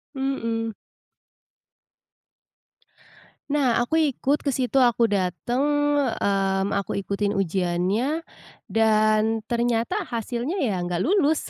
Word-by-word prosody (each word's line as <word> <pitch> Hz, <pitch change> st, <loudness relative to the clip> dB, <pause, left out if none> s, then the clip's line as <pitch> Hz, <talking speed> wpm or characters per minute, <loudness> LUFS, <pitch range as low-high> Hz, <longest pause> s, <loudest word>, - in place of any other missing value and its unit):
Mhm. 230 Hz, -4 st, -2 dB, 2.8 s
Nah 265 Hz, -5 st, +2 dB
aku 280 Hz, +7 st, 0 dB, 0.2 s
ikut 285 Hz, +5 st, 0 dB
ke 280 Hz, -, +2 dB
situ, 260 Hz, +1 st, 0 dB
aku 240 Hz, -3 st, +4 dB
dateng, 205 Hz, +7 st, -1 dB, 0.6 s
mmm, 195 Hz, 0 st, +1 dB
aku 195 Hz, -, -3 dB
ikutin 200 Hz, +1 st, -1 dB
ujiannya, 195 Hz, -, 0 dB, 0.5 s
dan 220 Hz, 0 st, +2 dB
ternyata 240 Hz, -, 0 dB
hasilnya 240 Hz, -, -3 dB
ya 210 Hz, -8 st, 0 dB
nggak 175 Hz, 0 st, -2 dB
lulus. 315 Hz, -, +1 dB
230 Hz, 95 wpm, -24 LUFS, 200-265 Hz, 2.8 s, aku